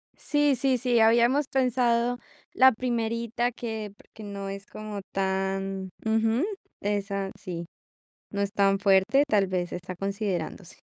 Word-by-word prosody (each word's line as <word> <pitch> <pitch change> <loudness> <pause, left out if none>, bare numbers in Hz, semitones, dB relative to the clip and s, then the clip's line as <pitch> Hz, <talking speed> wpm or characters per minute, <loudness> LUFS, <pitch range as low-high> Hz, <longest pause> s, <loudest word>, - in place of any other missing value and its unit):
Sí, 290 -2 +2
sí, 260 0 +2
sí, 245 -1 +2
habíamos 240 +5 +4
pensado 245 -2 +2 0.4
la 260 0 +7
primerita 235 0 -1
que 220 -3 -5
pr - - -22
que 220 - -10
no 200 -1 -5
es 195 0 -7
como 215 -1 -7
tan 195 0 -1 0.2
ujú, 225 +4 +2 0.4
esa 200 -1 -2
sí, 170 -4 -6 0.7
no 200 - -2
es 200 0 -1
tan 195 -1 +3
fuerte. 200 +7 +4
Tal 205 -6 +3
vez, 180 -1 -2
está 180 +1 -6
considerándose. 195 -3 -3
215 Hz, 135 wpm, -27 LUFS, 195-240 Hz, 0.7 s, la